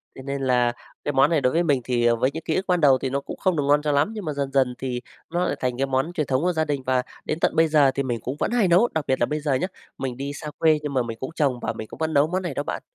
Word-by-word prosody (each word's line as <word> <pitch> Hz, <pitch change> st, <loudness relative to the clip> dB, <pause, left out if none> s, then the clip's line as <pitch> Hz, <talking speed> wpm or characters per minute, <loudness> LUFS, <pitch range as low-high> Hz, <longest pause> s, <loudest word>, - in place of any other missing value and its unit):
thế 130 Hz, -, -9 dB
nên 140 Hz, 0 st, -3 dB
là 125 Hz, -2 st, +2 dB, 0.3 s
cái 145 Hz, -, -1 dB
món 135 Hz, +2 st, +5 dB
này 165 Hz, -4 st, +2 dB
đối 125 Hz, +1 st, +2 dB
với 170 Hz, -, +3 dB
mình 145 Hz, -6 st, +2 dB
thì, 120 Hz, -1 st, 0 dB
ờ, 120 Hz, 0 st, +4 dB
với 130 Hz, +4 st, +1 dB
những 160 Hz, +2 st, -6 dB
ký 160 Hz, -, -1 dB
ức 190 Hz, -, -1 dB
ban 180 Hz, -2 st, +2 dB
đầu 135 Hz, -3 st, +6 dB
thì 130 Hz, -, -2 dB
nó 140 Hz, +1 st, -1 dB
cũng -, -, -8 dB
không 185 Hz, -3 st, +1 dB
được 145 Hz, -, +1 dB
ngon 145 Hz, +1 st, +4 dB
cho 150 Hz, -, 0 dB
lắm 145 Hz, +8 st, +2 dB
nhưng 210 Hz, -4 st, -6 dB
mà 150 Hz, -, -2 dB
dần 140 Hz, -1 st, -3 dB
dần 130 Hz, -2 st, +2 dB
thì 125 Hz, -2 st, -3 dB, 0.3 s
nó 175 Hz, +2 st, 0 dB
lại -, -, -1 dB
thành 125 Hz, -1 st, -1 dB
cái 135 Hz, -, +1 dB
món 135 Hz, +6 st, 0 dB
truyền 155 Hz, -5 st, -1 dB
thống 130 Hz, 0 st, +1 dB
của 180 Hz, +1 st, +1 dB
gia 160 Hz, -1 st, 0 dB
đình 140 Hz, -3 st, -2 dB
và 130 Hz, -1 st, +1 dB, 0.2 s
đến 155 Hz, -, -2 dB
tận -, -, +2 dB
bây 160 Hz, 0 st, +5 dB
giờ 150 Hz, -3 st, +4 dB
thì 140 Hz, +1 st, -2 dB
mình 120 Hz, -3 st, -2 dB
cũng 130 Hz, -, -4 dB
vẫn -, -, 0 dB
hay 235 Hz, -6 st, +3 dB
nấu. 185 Hz, +8 st, +4 dB
Đặc 160 Hz, -3 st, -1 dB
biệt 130 Hz, -, +1 dB
là -, -, +3 dB
bây 150 Hz, +4 st, -2 dB
giờ 145 Hz, -2 st, 0 dB
nhá, 130 Hz, +8 st, 0 dB, 0.3 s
mình 130 Hz, -2 st, -4 dB
đi 140 Hz, +1 st, -4 dB
xa 150 Hz, 0 st, -7 dB
quê 155 Hz, -2 st, +4 dB
nhưng 145 Hz, -2 st, -3 dB
mà 130 Hz, -2 st, +2 dB
mình 115 Hz, -1 st, -6 dB
cũng 130 Hz, -, -4 dB
trồng 135 Hz, -5 st, +1 dB
và -, -, -2 dB
mình 110 Hz, -, -7 dB
cũng -, -, -11 dB
vẫn 160 Hz, 0 st, -1 dB
nấu 145 Hz, +2 st, +4 dB
món 185 Hz, +3 st, -1 dB
này 175 Hz, -, -3 dB
đó 145 Hz, -, -2 dB
bạn. -, -, -4 dB
140 Hz, 350 wpm, -24 LUFS, 130-160 Hz, 0.3 s, đầu